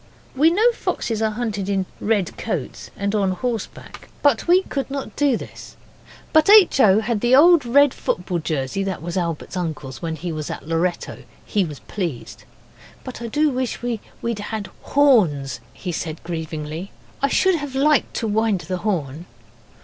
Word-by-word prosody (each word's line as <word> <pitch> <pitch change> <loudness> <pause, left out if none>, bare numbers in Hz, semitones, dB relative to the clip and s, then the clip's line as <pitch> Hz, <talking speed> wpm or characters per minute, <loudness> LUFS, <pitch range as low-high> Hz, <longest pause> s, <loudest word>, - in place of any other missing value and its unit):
We 300 +5 +5
know 430 +8 +4
foxes 225 - -3
are 220 - +2
hunted 210 -3 -3
in 195 -2 0
red 205 -4 0
coats - - -5
and 200 +1 -1
on 195 -3 +1
horseback 230 +2 -5
but 285 -2 +3
we 365 +2 +5
could 275 -6 -4
not 275 0 -5
do 280 -5 +2
this - - -11 0.6
but 315 +3 +5
H. 410 -8 +7
O. 210 -3 +6
had 225 -2 -1
the 245 +1 +4
old 325 -1 +6
red 285 +2 +5
football 180 0 -2
jersey 155 +3 -2
that 190 -4 -4
was 175 0 -4
Albert's 170 -1 -3
uncle's 155 -7 -4
when 165 -2 -3
he 170 +3 -5
was 155 -2 -5
at - - -7
Loretto. 165 +2 -1 0.3
He 205 -3 +1
was 150 -5 -7
pleased. 170 - -5 0.6
'But 255 -2 -8
I 235 - -4
do 295 +6 +2
wish 255 -2 -3
we'd 235 -1 -4
had 205 -3 -5
horns,' 200 - +3
he 180 +7 -6
said 160 -1 -5
grievingly. 160 +1 -5 0.3
'I 275 - +3
should 375 +6 +3
have 285 -3 -6
liked 290 +1 +2
to 225 - -1
wind 215 -3 +1
the 180 +2 -4
horn. 170 -5 -3
210 Hz, 170 wpm, -22 LUFS, 170-260 Hz, 0.6 s, H